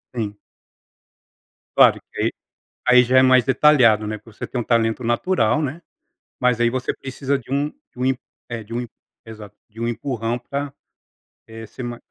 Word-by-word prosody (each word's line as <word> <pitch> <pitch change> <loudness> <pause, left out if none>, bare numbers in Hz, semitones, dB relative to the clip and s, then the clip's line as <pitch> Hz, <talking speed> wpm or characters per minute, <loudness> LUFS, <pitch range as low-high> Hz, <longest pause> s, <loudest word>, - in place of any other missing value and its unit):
Sim. 105 -3 -3 1.4
Claro - - +6
que, - - -5
aí - - +3 0.6
aí 125 0 +7
já 130 +1 +4
é - - +7
mais 130 -2 +5
detalhado, 130 -6 +4
né, 110 - -3
porque 110 0 -19
você - - -4
tem 125 - -3
um - - -4
talento 115 +1 +1
natural, 120 +1 +1
né. 145 +4 -3 0.6
Mas, 125 -2 +2
aí 120 0 +3
você 130 +1 -2
precisa 135 +1 -3
de 130 - -15
um 145 +2 +1
de 290 - -25
um 125 - -1
em 130 0 +2 0.3
é 115 -2 -5
de 110 - -13
um 120 0 -2 0.4
Exato! 105 -2 -11
De 110 +1 -18
um 115 - -1
empurrão 120 0 -2
pra 140 +3 -5 0.7
eh 110 0 -9
ser 110 - -9
mais 120 -1 -6
120 Hz, 185 wpm, -21 LUFS, 115-130 Hz, 1.4 s, aí